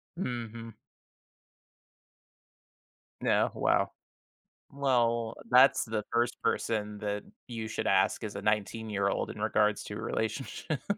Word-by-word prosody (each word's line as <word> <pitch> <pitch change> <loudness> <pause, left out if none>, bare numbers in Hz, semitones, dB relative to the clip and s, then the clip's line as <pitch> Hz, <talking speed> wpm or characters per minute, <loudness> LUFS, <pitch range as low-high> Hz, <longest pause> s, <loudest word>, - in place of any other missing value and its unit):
Mhm. 115 - -5 2.4
Yeah, - - +3
wow, - - +2 0.8
well, 120 -5 +1 0.2
that's 130 +2 +6
the 110 -2 -2
1st 120 0 +1
person 105 -2 -1
that 105 -1 -2 0.2
you 115 -2 -4
should 110 - -3
ask, - - +3
is 105 -2 -5
a 100 - -4
nineteen-year-old 105 -1 0
in - - -7
regards 105 -1 +2
to 105 - -6
relationships. 130 +6 -3
110 Hz, 105 wpm, -30 LUFS, 105-120 Hz, 2.4 s, that's